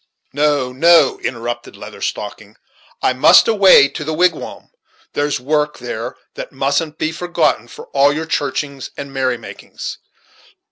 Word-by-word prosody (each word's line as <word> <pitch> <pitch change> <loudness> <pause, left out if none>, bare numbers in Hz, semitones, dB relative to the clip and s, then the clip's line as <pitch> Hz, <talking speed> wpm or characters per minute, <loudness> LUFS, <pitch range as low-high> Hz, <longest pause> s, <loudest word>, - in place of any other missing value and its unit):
"No, 145 -3 +1
no," 160 +1 +4
interrupted 120 -1 -5
the - - -16
Leather - - -10
Stocking, - - -5 0.5
"I - - +3
must 130 +5 +6
away 195 -10 +6
to 155 - -6
the 155 +1 -3
wigwam; 175 -1 -1 0.4
there's 145 0 -1
work 150 +3 -1
there 120 0 -6 0.2
that - - -8
mustn't 140 +3 -1
be 155 - -1
forgotten 170 -8 -1
for - - -11
all 140 +1 +3
your 155 +2 -3
churchings 140 -3 -3
and 140 -1 -7
merry 130 -2 0
makings. 115 - -9
145 Hz, 145 wpm, -17 LUFS, 130-155 Hz, 0.5 s, must